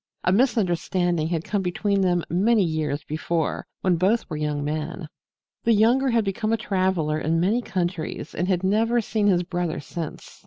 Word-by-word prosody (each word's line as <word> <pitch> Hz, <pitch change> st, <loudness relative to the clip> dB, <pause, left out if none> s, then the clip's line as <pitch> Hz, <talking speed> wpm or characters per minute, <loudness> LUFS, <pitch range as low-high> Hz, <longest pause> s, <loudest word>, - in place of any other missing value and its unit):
A 180 Hz, -, +2 dB
misunderstanding 180 Hz, -, +1 dB
had 165 Hz, -1 st, -2 dB
come 205 Hz, +1 st, -1 dB
between 195 Hz, +2 st, 0 dB
them 175 Hz, -2 st, +2 dB
many 205 Hz, +5 st, +3 dB
years 155 Hz, -3 st, -1 dB
before 160 Hz, +1 st, -2 dB
when 180 Hz, -2 st, +2 dB
both 200 Hz, +7 st, +1 dB
were -, -, -2 dB
young 150 Hz, -1 st, -2 dB
men. 155 Hz, +3 st, -4 dB, 0.6 s
The 230 Hz, -, +4 dB
younger 240 Hz, +6 st, +4 dB
had 230 Hz, -3 st, +2 dB
become 215 Hz, +3 st, -1 dB
a 225 Hz, -, +2 dB
traveler 185 Hz, -7 st, 0 dB
in 160 Hz, +2 st, 0 dB
many 205 Hz, +8 st, +2 dB
countries 180 Hz, -6 st, -3 dB
and 175 Hz, -, -1 dB
had 185 Hz, -1 st, 0 dB
never 225 Hz, +5 st, +2 dB
seen 215 Hz, -2 st, 0 dB
his 180 Hz, -3 st, +3 dB
brother 175 Hz, -2 st, -2 dB
since. 160 Hz, +2 st, -7 dB
180 Hz, 170 wpm, -24 LUFS, 165-210 Hz, 0.6 s, The